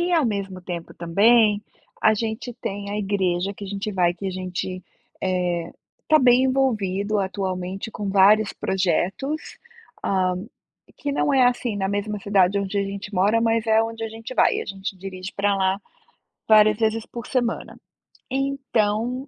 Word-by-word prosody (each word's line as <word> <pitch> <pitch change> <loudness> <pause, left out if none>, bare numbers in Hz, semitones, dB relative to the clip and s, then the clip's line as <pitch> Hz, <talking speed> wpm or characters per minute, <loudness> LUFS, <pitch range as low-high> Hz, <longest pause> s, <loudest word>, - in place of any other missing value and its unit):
E 350 +1 0
ao 325 -5 +4
mesmo 195 -4 -3
tempo 175 -2 -6
também 210 +5 +4 0.4
a 220 - +5
gente 225 +3 -3
tem 200 -4 -5
a 205 - -2
igreja 195 -2 0
que 205 - -9
a - - -6
gente 200 +2 -4
vai 175 -2 +2
que 195 - -6
a - - -1
gente, 185 0 -4 0.4
eh, 175 -2 -1 0.4
tá 310 0 +6
bem 250 0 +5
envolvido 215 -6 +1
atualmente 190 +1 -3
com 205 -2 -5
vários 200 +2 +5
projetos, 190 - -1 0.5
hã, 185 -2 +1 0.5
e - - -21
que 285 - -3
não 285 - +1
é, 255 -2 +6
assim, 245 -3 0
na 195 -1 -1
mesma 205 +1 -2
cidade 195 -1 +3
onde 200 +1 -2
a - - +2
gente 200 +1 -6
mora 205 +5 +3
mas 230 0 +1
é 220 0 +4
onde 225 0 -5
a - - -3
gente 225 +3 -8
vai, - - +3
a - - -4
gente 195 0 -5
dirige 185 0 -7
para 200 0 +1
lá 190 0 +1 0.7
várias 215 -1 +6
vezes 220 0 0
por 235 -1 -8
semana, 240 -3 -2 0.5
então 255 -2 -1
205 Hz, 170 wpm, -23 LUFS, 190-225 Hz, 0.7 s, tá